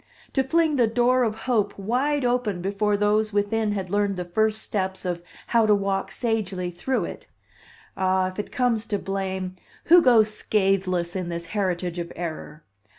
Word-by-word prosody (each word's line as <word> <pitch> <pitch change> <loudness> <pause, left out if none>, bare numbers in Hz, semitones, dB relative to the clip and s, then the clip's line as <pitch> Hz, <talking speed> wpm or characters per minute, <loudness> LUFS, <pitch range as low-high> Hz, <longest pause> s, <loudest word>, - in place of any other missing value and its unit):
To 270 - +3
fling 315 +2 +2
the 240 -3 +4
"door 245 +3 +3
of 220 -3 +1
hope" 215 -5 +1
wide 255 +7 0
open 245 -6 0
before 200 +3 0
those 210 +1 +2
within 205 +1 0
had 190 -3 -4
learned 205 -1 +1
the 180 - -3
first 220 +4 0
steps 190 -2 -3
of 175 -1 -2 0.2
how 230 -2 +3
to 210 - +5
walk 195 -1 -1
sagely 195 -5 -2
through 255 +10 -1
it! - - -9 0.7
Ah, 185 -1 +1
if 185 - -9
it 210 - -4
comes 240 -3 0
to 210 - 0
blame, 190 -1 -3 0.3
who 350 +2 +7
goes 225 -6 +5
scatheless 190 -4 0
in 180 -2 -3
this 170 0 -4
heritage 180 -4 -1
of 170 0 -5
error? 160 -2 -6
205 Hz, 170 wpm, -24 LUFS, 185-225 Hz, 0.7 s, who